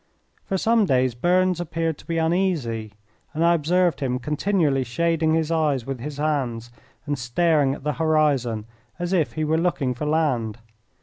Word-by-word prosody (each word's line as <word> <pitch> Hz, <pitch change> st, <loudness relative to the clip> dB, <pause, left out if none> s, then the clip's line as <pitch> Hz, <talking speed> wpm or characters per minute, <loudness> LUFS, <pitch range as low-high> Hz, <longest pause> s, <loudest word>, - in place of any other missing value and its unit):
For 195 Hz, -, -1 dB
some 225 Hz, +2 st, +3 dB
days 130 Hz, -5 st, +2 dB
Burns 180 Hz, +7 st, +2 dB
appeared 165 Hz, -2 st, -2 dB
to -, -, -16 dB
be 165 Hz, -, -1 dB
uneasy, 160 Hz, -, 0 dB, 0.4 s
and 165 Hz, +2 st, +2 dB
I 170 Hz, -, +5 dB
observed 170 Hz, 0 st, +1 dB
him 125 Hz, -2 st, -1 dB
continually 150 Hz, 0 st, 0 dB
shading 160 Hz, +5 st, +1 dB
his 160 Hz, 0 st, 0 dB
eyes 150 Hz, -7 st, +1 dB
with 135 Hz, -2 st, -4 dB
his 145 Hz, +3 st, -6 dB
hand 130 Hz, -6 st, -1 dB, 0.4 s
and 145 Hz, -2 st, -2 dB
staring 140 Hz, +2 st, +2 dB
at -, -, -12 dB
the 150 Hz, 0 st, -1 dB
horizon 145 Hz, -8 st, +1 dB, 0.3 s
as 175 Hz, +1 st, -3 dB
if 155 Hz, -10 st, +1 dB
he 155 Hz, -, -2 dB
were 160 Hz, +1 st, +1 dB
looking 160 Hz, -7 st, 0 dB
for 150 Hz, +5 st, -4 dB
land. 130 Hz, -9 st, 0 dB
155 Hz, 170 wpm, -23 LUFS, 130-170 Hz, 0.4 s, I